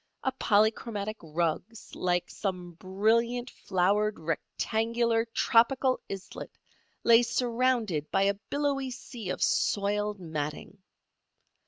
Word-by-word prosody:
A 265 - +1
polychromatic 215 -1 +1
rug 165 0 -1 0.3
like 175 -1 0
some 180 -3 -4
brilliant 225 +8 0
flowered 205 +3 +1
rectangular, 225 +8 0
tropical 240 +3 +3
islet 195 -1 -7 0.5
lay 230 0 +7
surrounded 235 - 0
by 195 - +2
a 200 0 +3
billowy 275 +5 -2
sea 245 -5 -8
of - - -1
soiled 205 0 +1
matting. 160 +3 -5
210 Hz, 100 wpm, -29 LUFS, 185-235 Hz, 0.5 s, lay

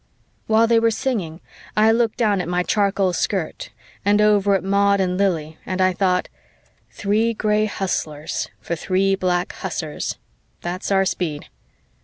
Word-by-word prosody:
_" - - -41 0.4
While 220 +1 +4
they 230 0 +4
were 230 0 +3
singing, 215 - -2 0.4
I 215 +1 +5
looked 230 -1 +1
down 210 -5 +2
at 170 - -5
my 180 0 +1
charcoal 200 -2 +1
skirt 180 -1 -2 0.3
and 205 +1 +3
over 205 -2 +4
at 190 - -1
Maud 200 +1 +3
and 180 -1 0
Lili 165 -5 -1
and 185 0 -4
I 185 0 +3
thought, 180 -1 +1 0.6
"Three 220 +3 0
gray 215 0 +1
hustlers 155 -7 -3
for 170 - -3
three 190 +3 +1
black 180 -1 0
hussars, 160 -4 -4 0.4
that's 180 +3 -4
our 195 0 +3
speed." 170 -4 -3
195 Hz, 155 wpm, -21 LUFS, 180-210 Hz, 0.6 s, I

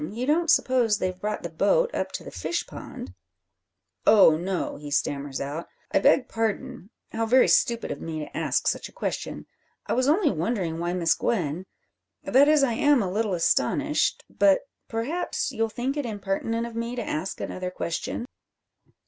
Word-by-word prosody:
You 235 +5 -4
don't 325 +4 +2
suppose 250 -8 +3
they've 185 -1 -3
brought 210 0 -3
the 170 - -4
boat 470 - +2
up - - -2
to - - -5
the - - -9
fishpond!" 345 - -5 0.9
"Oh, 195 -7 +7
no," 180 +3 -3
he 145 0 -8
stammers 140 -1 -1
out. 145 +5 -4 0.2
"I - - +4
beg 265 - +4
pardon. 225 0 -3 0.2
How 225 0 -1
very 255 +3 +5
stupid 235 -1 +2
of - - -5
me 160 -1 -5
to 150 - -7
ask - - 0
such - - -1
a - - -21
question. - - -4 0.4
I - - -1
was 255 +2 +1
only 320 +2 +3
wondering 175 -2 -2
why 175 +1 -1
Miss 170 -3 +2
Gwen 180 -4 -2 0.6
that 275 +3 +5
is, 300 -2 +5
I 250 -4 +2
am 290 -2 +3
a 185 - -2
little 210 -1 0
astonished 165 - +1
but 200 -1 +3 0.3
perhaps 245 +10 -2
you'll 225 0 -1
think 250 +5 -3
it 290 -4 -2
impertinent 215 +2 -2
of 235 -1 -8
me 230 +1 -3
to 245 - -3
ask 160 +5 -3
another 185 0 -4
question?" 180 +6 -4
220 Hz, 175 wpm, -26 LUFS, 180-250 Hz, 0.9 s, Oh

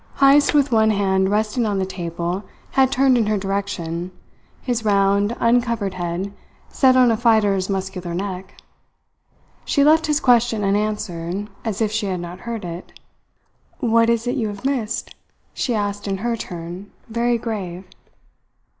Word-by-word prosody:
Heyst, 280 +2 +5
with 285 -2 +3
one 220 -1 +4
hand 190 -2 +2
resting 215 +3 0
on 205 -2 0
the 190 - 0
table, 175 0 -4 0.3
had 265 -1 +3
turned 260 -1 +4
in 220 - +1
her 215 0 +1
direction, 190 -3 -3 0.5
his 240 -3 -2
round, 200 +1 +2
uncovered 230 -4 +1
head 180 +2 -4 0.4
set 260 -2 +4
on 250 -2 +5
a - - +2
fighter's 215 -5 +2
muscular 190 -3 -3
neck. 190 0 -5 1.1
She 280 - +2
left 315 +2 +4
his 300 -1 +2
question 240 -4 +3
unanswered, 200 -2 -2
as 220 -2 -3
if 215 -1 +1
she 215 -1 -1
had 185 -2 -2
not 175 +1 -7
heard 225 -5 -4
it. 170 +1 -8 0.8
"What 230 -1 +3
is 230 0 +1
it 245 - -1
you 225 -4 0
have 205 +3 -7
missed?" 250 -6 -2 0.4
she 245 - -1
asked 205 -1 -2
in 195 -1 -1
her 240 -1 +1
turn, 175 0 -7 0.2
very 235 +1 +1
grave. 195 -6 -5
210 Hz, 155 wpm, -21 LUFS, 190-235 Hz, 1.1 s, Heyst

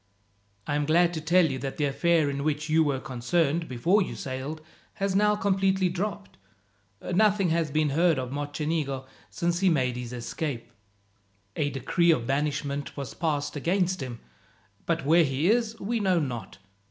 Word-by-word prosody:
"I 145 - -2
am 145 0 0
glad 170 +2 +4
to 160 - -3
tell 170 +3 +4
you 135 -4 -2
that 135 +1 -5
the 150 - +1
affair 160 +2 +2
in 140 0 -2
which 155 +1 -1
you 160 +1 +4
were 140 -3 0
concerned, 150 +6 0
before 170 - +2
you 185 - -3
sailed, 135 +4 -5 0.4
has 195 -1 -1
now 210 +1 +4
completely 195 -2 +1
dropped. 200 - -4 0.7
Nothing 200 -1 +3
has 165 -1 +1
been 155 +1 +1
heard 165 +1 +3
of 130 -1 -3
Mocenigo 145 -1 -2 0.2
since 170 0 -1
he 190 -1 +4
made 130 -6 +1
his 125 -1 -6
escape. 125 +1 -4 0.8
"A 145 - 0
decree 170 +5 +1
of 130 -8 +3
banishment 140 +1 -2
was 140 -2 -5
passed 150 -4 -2
against 180 +3 0
him, 125 -3 -6 0.7
but 165 -4 0
where 165 +3 +5
he 145 +6 +1
is 230 -1 0
we 230 +4 -1
know 190 -3 +2
not. 120 -9 -5
155 Hz, 165 wpm, -27 LUFS, 140-175 Hz, 0.8 s, where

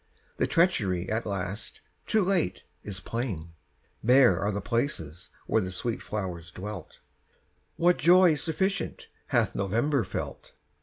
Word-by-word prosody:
The - - +1
treachery, 100 - +2
at 110 +1 -1
last, 100 +1 -4 0.3
too 215 -2 +3
late, 180 - 0 0.2
is 100 -2 -6
plain; 100 -8 -4 0.5
Bare 125 -6 +6
are 100 +2 0
the 100 - -2
places 90 - -2 0.2
where 110 - +2
the 95 - -3
sweet 110 +6 -2
flowers 90 -5 -4
dwelt. 100 +4 -8 0.7
What 175 +1 +3
joy 180 0 +6
sufficient 175 +5 -2 0.2
hath - - +2
November 115 +7 +1
felt? 95 - -6
110 Hz, 125 wpm, -28 LUFS, 95-150 Hz, 0.7 s, Bare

